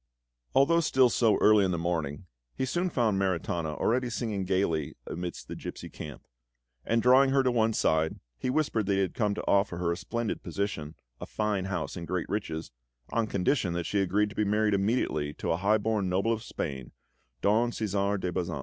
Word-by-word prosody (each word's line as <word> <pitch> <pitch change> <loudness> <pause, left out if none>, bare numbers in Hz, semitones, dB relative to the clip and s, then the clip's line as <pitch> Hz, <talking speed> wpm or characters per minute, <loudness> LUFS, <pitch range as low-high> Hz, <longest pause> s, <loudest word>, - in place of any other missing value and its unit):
Although 165 +5 +5
still 130 -6 +4
so 110 -4 +3
early 105 -1 +6
in 95 - +1
the 90 - 0
morning, 85 -2 -2 0.3
he - - -1
soon 175 +8 0
found 110 - +1
Maritana 85 -4 -1
already 125 +1 +1
singing 110 -5 -2
gaily 85 -6 0
amidst 90 +1 -6
the - - -6
gipsy - - -7
camp; 75 -4 -9 0.6
and 115 0 +1
drawing 130 +2 +6
her 135 0 +3
to 130 - +2
one 115 -2 +2
side, 80 -5 +1 0.2
he - - -2
whispered 125 -7 0
that 100 - +2
he - - +1
had 95 -2 0
come 105 -3 0
to - - -5
offer 100 -3 +2
her 85 -1 0
a - - 0
splendid 110 +5 -3
position, 80 -7 -4 0.2
a - - -7
fine 105 -3 -1
house, 90 -7 -3
and 85 -1 -6
great 90 -1 -2
riches, 85 -6 -3 0.4
on 115 -1 +1
condition 100 -1 +1
that 85 -1 -2
she 105 - 0
agreed 105 +3 +1
to - - -12
be 105 - +1
married 105 +1 +2
immediately 95 -8 0
to - - -2
a 80 - +1
high 100 +4 +3
born 105 -3 0
noble 100 +5 +1
of 110 - -4
Spain, 70 - -5 0.5
Don 110 +4 +3
Cæsar 100 -3 -1
de 90 -1 -2
Bazan. 90 -1 -2
100 Hz, 200 wpm, -29 LUFS, 90-115 Hz, 0.6 s, early